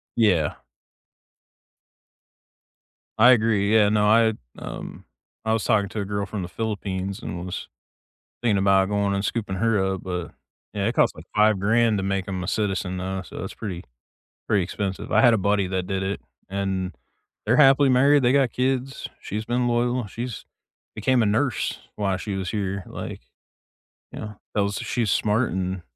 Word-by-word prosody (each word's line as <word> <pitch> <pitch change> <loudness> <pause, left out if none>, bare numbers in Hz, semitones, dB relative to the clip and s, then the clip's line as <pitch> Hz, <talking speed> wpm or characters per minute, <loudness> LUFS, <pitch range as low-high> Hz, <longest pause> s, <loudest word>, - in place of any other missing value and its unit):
Yeah. 90 -10 +3 2.6
I 120 +4 +8
agree, 110 -3 +3
yeah, 105 -2 +5
no, 105 -1 +2
I, 110 0 +5 0.3
um - - -8 0.4
I 110 - +2
was 110 - 0
talking 105 -3 +2
to 105 - -3
a - - -3
girl 100 0 -2
from 100 0 -5
the 90 - -4
Philippines 100 -3 -3
and 85 +1 -5
I - - -6
was 90 - -5 0.8
thinking 105 -5 +2
about 95 0 +4
going 100 -1 +1
and 100 +1 -1
scooping 105 -5 -2
her 115 0 +2 0.2
up, 95 - -7
but, 90 -2 -4 0.4
yeah, 100 -1 -1
it 115 - 0
costs - - +3
like - - -11
5 105 -1 +4
grand 115 +1 +3
to - - -1
make 95 -1 -1
'em 95 -2 -3
a - - -5
citizen 95 -3 -1
though, 95 +1 -3
so 90 - -8
it's - - -7
pretty 95 -6 -6 0.6
pretty 100 -3 +2
expensive. 100 +3 -4
I - - +5
had 120 -3 +6
a - - +1
buddy 100 -1 +1
that 95 -1 -2
did 95 0 -2
it 95 +1 -2 0.3
and 95 -1 -2 0.5
they're 115 +4 +3
happily 135 -1 +6
married, 140 +2 +5
they 125 +1 +4
got 135 -3 +3
kids, 130 +1 -1
she's 105 +2 -4
been 120 +1 0
loyal, 120 -1 0
she's 120 +3 -6 0.5
became 120 +4 +2
a - - +3
nurse 115 +6 0 0.2
while 100 -3 0
she 100 +1 -4
was 95 -2 -3
here, 100 -2 -2
like - - -7 0.9
Yeah, 105 -1 -7 0.2
that 105 - +2
was 100 0 -1
she's 115 -4 -1
smart 110 +5 +1
and 95 0 -2
105 Hz, 175 wpm, -24 LUFS, 95-115 Hz, 2.6 s, I